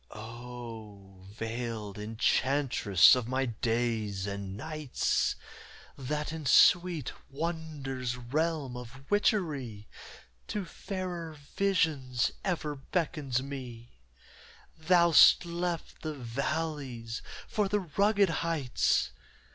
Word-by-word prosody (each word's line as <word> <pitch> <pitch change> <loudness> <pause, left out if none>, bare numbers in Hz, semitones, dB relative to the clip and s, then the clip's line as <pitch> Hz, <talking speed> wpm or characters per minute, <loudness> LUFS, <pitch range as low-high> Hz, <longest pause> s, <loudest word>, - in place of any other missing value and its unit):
O 110 -4 -9
veiled 115 -1 -5
enchantress 115 -1 +4
of 125 -3 +1
my 130 +2 0
days 115 -4 -1
and 100 -1 -5
nights, 155 0 -1 0.6
That 150 +3 -3
in 155 -3 -4
sweet 170 +1 +5 0.2
wonder's 140 -5 -3
realm 145 +1 -1
of 125 +2 -9
witchery 145 - 0 0.6
To 205 -3 -3
fairer 175 -4 -5 0.2
visions 155 -11 +1
ever 165 -6 -1
beckons 140 -3 -1
me, 120 - -8 0.8
Thou'st 170 +1 +6
left 170 0 -3
the 155 -1 -4
valleys 130 -2 -3 0.3
for 210 -2 0
the 210 0 +1
rugged 200 +3 +2
heights! 160 -7 +1
135 Hz, 90 wpm, -30 LUFS, 115-165 Hz, 0.8 s, Thou'st